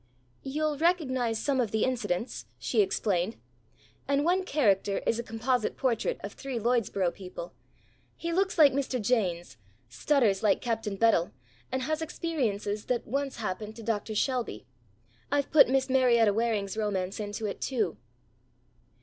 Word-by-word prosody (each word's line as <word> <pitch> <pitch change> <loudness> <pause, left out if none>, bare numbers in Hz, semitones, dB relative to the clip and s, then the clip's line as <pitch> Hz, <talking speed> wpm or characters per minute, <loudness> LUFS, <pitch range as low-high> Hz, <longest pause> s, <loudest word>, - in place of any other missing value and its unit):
"You'll 300 +1 -2
recognize 260 -9 +1
some 265 +3 +1
of 230 - -1
the 220 +1 0
incidents," 205 - -2
she 125 - +1
explained, 190 0 0 0.7
"and 280 +1 +2
one 365 +2 +2
character 200 - +2
is 230 - +1
a - - -2
composite 230 +1 -1
portrait 265 - 0
of - - -6
three 270 -3 -5
Lloydsboro 225 -6 +1
people. 195 - -8 0.6
He 335 0 -3
looks 380 +2 +1
like 295 -4 +7
Mr. 265 -2 -1
Jaynes, 190 - 0 0.3
stutters 205 - +2
like 205 -3 +3
Captain 225 -4 -2
Bedel 195 -5 +3 0.4
and 260 0 -1
has 310 +3 -1
experiences 220 -11 -2
that 245 -2 -1
once 275 +3 -2
happened 215 0 -4
to 230 - -9
Doctor 215 -1 -2
Shelby. 250 - -1 0.7
I've 285 -1 0
put 295 -4 +7
Miss 265 0 +2
Marietta 240 -5 +4
Waring's 215 -3 0
romance 195 -3 -2
into 210 +1 -4
it 205 - -4
too." 220 -10 -1
230 Hz, 145 wpm, -29 LUFS, 205-270 Hz, 0.7 s, like